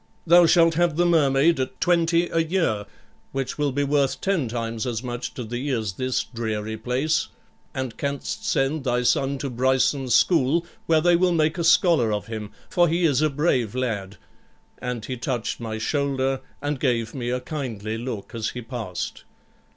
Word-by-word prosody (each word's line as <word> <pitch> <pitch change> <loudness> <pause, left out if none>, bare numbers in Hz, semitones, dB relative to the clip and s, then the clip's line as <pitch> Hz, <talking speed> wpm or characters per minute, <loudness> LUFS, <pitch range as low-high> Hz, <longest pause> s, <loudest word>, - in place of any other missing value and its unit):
Thou 170 0 +7
shalt 165 -1 +5
have 170 -1 +2
the 175 - +3
Mermaid 150 -2 +3
at 130 0 -3
20 170 0 +2
a 165 - 0
year, 160 - 0 0.5
which 135 +1 -3
will 145 -1 +1
be 145 +2 0
worth 140 -1 +1
ten 190 -9 0
times 115 0 -3
as 115 -1 -3
much 120 0 -5
to 125 - -4
thee 120 +5 -4
as 110 -7 -1
this 130 +5 -1
dreary 110 -2 -4
place; 130 +8 0 0.5
and 130 -4 -3
canst 140 -1 -3
send 135 +2 0
thy 125 -1 0
son 135 +3 +1
to 140 - -4
Bryson's 130 +1 +1
school, 165 0 +3 0.2
where 160 -1 +4
they 175 +1 +4
will 180 +1 +3
make 155 +1 +1
a - - 0
scholar 165 - +4
of 105 -1 -2
him, 110 -2 -6 0.2
for 175 -1 +3
he 170 +2 0
is 145 -3 +3
a 155 - +3
brave 135 -7 0
lad'; 105 -6 -3 0.6
and 125 -3 -4
he 130 - -4
touched 120 0 -3
my 110 -2 -4
shoulder, 135 +2 0 0.2
and 145 -1 -1
gave 115 -4 0
me 120 -3 -3
a 125 +1 0
kindly 115 -8 -4
look 115 -4 -6
as 115 -2 -2
he 125 - -7
passed. 115 -6 -5
130 Hz, 180 wpm, -24 LUFS, 120-155 Hz, 0.6 s, Thou